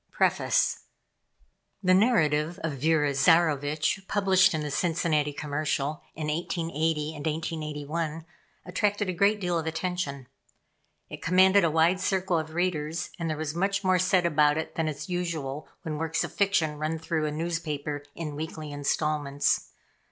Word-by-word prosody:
PREFACE. - - +1 1.0
The 185 0 +4
narrative 175 -6 +3
of 165 - -1
Vera 150 -1 +2
Zarovitch, 155 +5 +2
published 190 -3 +4
in 155 - -1
the 150 -1 -4
Cincinnati 160 -3 +1
Commercial 150 +1 -2
in 155 - -4
1880 160 -1 -1
and 145 - -7
1881, 155 0 -3 0.4
attracted 205 +2 0
a - - 0
great 200 +4 +3
deal 175 -3 0
of 160 - -5
attention. 160 -5 -3 0.8
It - - -9
commanded 190 +3 +5
a 170 - +3
wide 165 +4 +3
circle 185 -2 +1
of 155 0 -6
readers, 165 -2 -1
and 165 -1 -2
there 155 - -2
was 155 -1 -3
much 195 +4 0
more 185 -1 +3
said 185 0 +3
about 150 -2 +3
it 160 - -4
than 160 -1 -1
is 155 0 -4
usual 160 -6 -3 0.2
when 155 -3 -4
works 160 0 0
of - - -6
fiction 165 -7 +1
run 155 +1 -1
through 160 -1 -1
a - - -2
newspaper 150 -3 -3
in 150 -3 -5
weekly 155 0 -6
installments. 145 0 0
160 Hz, 150 wpm, -27 LUFS, 150-180 Hz, 1.0 s, commanded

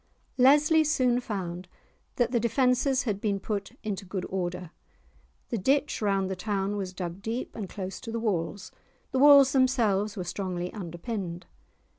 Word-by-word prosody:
Leslie 295 +5 +6
soon 255 -5 +2
found 185 -6 -5 0.5
that 240 -1 +1
the 240 - +2
defences 250 +3 +2
had 205 -5 -2
been 200 -2 0
put 200 +1 -4
into 205 -3 -3
good 190 -1 -4
order; 180 -2 -3 0.8
the 230 - -2
ditch 275 +8 +1
round 195 -2 +1
the 190 - -3
town 200 0 -2
was 195 -2 -3
dug 180 0 -6
deep, 225 +4 -4
and 205 -5 -5
close 190 -2 -6
to 225 - -7
the 230 - -2
walls; 200 -3 -2 0.4
the 265 - 0
walls 280 -1 +8
themselves 220 -6 +2
were 185 - -2
strongly 180 0 -4
underpinned. 180 -1 -5
205 Hz, 155 wpm, -28 LUFS, 185-250 Hz, 0.8 s, walls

